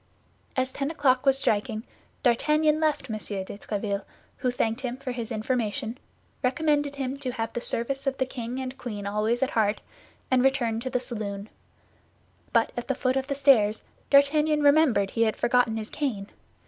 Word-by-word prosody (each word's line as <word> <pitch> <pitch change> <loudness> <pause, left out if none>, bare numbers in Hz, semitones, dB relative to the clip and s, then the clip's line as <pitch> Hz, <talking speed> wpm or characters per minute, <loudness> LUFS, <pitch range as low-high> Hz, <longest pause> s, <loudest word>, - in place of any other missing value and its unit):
As 260 0 0
ten 275 +1 -2
o'clock 275 -4 +2
was 270 0 +5
striking, 220 -2 0 0.4
D'Artagnan 300 +5 +3
left 305 -4 0
M. 220 -3 -3
de 200 -2 -4
Tréville, 200 -2 -2 0.3
who 255 - 0
thanked 230 -1 -1
him 250 -1 -3
for 270 -1 -5
his 240 -1 -4
information, 220 -1 -1 0.5
recommended 290 +2 +1
him 270 -1 -3
to 260 -3 -4
have 225 -2 -3
the 240 - -3
service 270 +4 -2
of 270 0 0
the 260 - +1
king 250 -1 -5
and 260 0 -5
queen 210 -6 -5
always 215 +4 +1
at 270 - 0
heart, 215 -2 +2 0.5
and 255 -1 +4
returned 240 -4 +1
to 260 - -3
the 250 - 0
saloon; 210 -4 -5 1.0
but 230 -1 +3
at 240 - -4
the 270 - 0
foot 255 -1 0
of 265 0 -1
the 280 - -1
stairs, 240 -7 +4 0.3
D'Artagnan 300 +2 +4
remembered 285 -10 +4
he 230 - -1
had 220 -1 +3
forgotten 240 -2 +2
his 215 -1 -5
cane. 220 -9 -3
250 Hz, 175 wpm, -27 LUFS, 220-275 Hz, 1.0 s, was